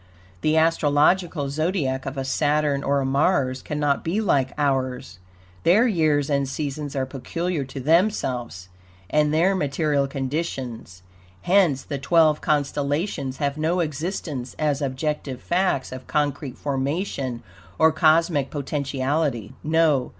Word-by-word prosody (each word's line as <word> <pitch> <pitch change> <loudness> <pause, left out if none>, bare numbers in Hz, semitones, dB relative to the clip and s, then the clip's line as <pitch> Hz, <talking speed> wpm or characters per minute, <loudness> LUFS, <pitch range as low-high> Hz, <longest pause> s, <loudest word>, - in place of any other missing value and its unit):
The 155 +1 +2
astrological 160 0 +2
Zodiac 145 -4 -1
of 135 - -5
a 135 - -2
Saturn 145 0 +1
or 140 0 +1
a - - -1
Mars 135 -2 +1
cannot 145 -1 -1
be 175 +6 -1
like 140 -11 +1
ours. 130 -8 -1 0.4
Their 200 - +5
years 155 - +2
and 140 -2 0
seasons 145 0 -4
are 135 -1 0
peculiar 160 +5 -3
to 135 +1 -8
themselves 130 - 0 0.4
and 150 0 +3
their 170 +5 +3
material 145 -3 0
conditions; 130 - -4 0.4
hence 175 -8 +3
the 140 -2 -5
twelve 155 +1 +3
constellations 145 -1 -1
have 140 +1 -2
no 165 +4 +1
existence 150 - -3
as 150 -2 0
objective 135 -1 -3
facts 175 -6 0
of 130 0 -8
concrete 145 -3 -1
formation 140 -2 -2 0.3
or 160 0 +5
cosmic 155 -2 +3
potentiality. 140 -4 -2
No! 155 -4 +2
145 Hz, 125 wpm, -23 LUFS, 135-160 Hz, 0.4 s, Their